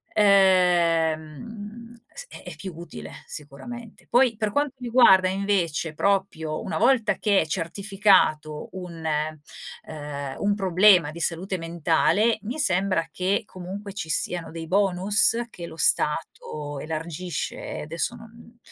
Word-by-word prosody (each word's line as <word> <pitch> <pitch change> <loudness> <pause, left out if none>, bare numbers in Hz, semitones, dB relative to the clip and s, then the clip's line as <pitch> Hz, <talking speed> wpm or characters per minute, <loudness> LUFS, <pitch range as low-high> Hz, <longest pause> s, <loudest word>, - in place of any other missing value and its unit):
ehm, 190 +3 +2 0.2
s - - -8
è - - -11
è - - -8
più 190 -2 -7
utile 170 +1 -9 0.2
sicuramente. 215 - -10
Poi 245 -1 +4
per 215 -2 -1
quanto 285 +2 0
riguarda 235 -7 +5
invece 185 -5 -1
proprio 160 -4 -1
una - - -3
volta 235 -1 +3
che 205 -3 +3
è - - -2
certificato 185 -3 +1
un 175 -3 -8
ehm, 150 -2 -5
un 205 0 +1
problema 185 -4 +4
di 170 - -9
salute 180 +3 -1
mentale, 170 +7 +1
mi 240 +7 -5
sembra 185 - +1
che 185 +4 0
comunque 195 +2 -8
ci 175 -5 -6
siano 170 +2 -2
dei 165 0 -6
bonus 195 +4 +2
che 170 - -8
lo 160 - -11
stato 150 -2 0
elargisce, 160 +2 -4
e - - -6
adesso 165 +9 -3
non 230 +1 -15
185 Hz, 130 wpm, -24 LUFS, 160-210 Hz, 0.2 s, riguarda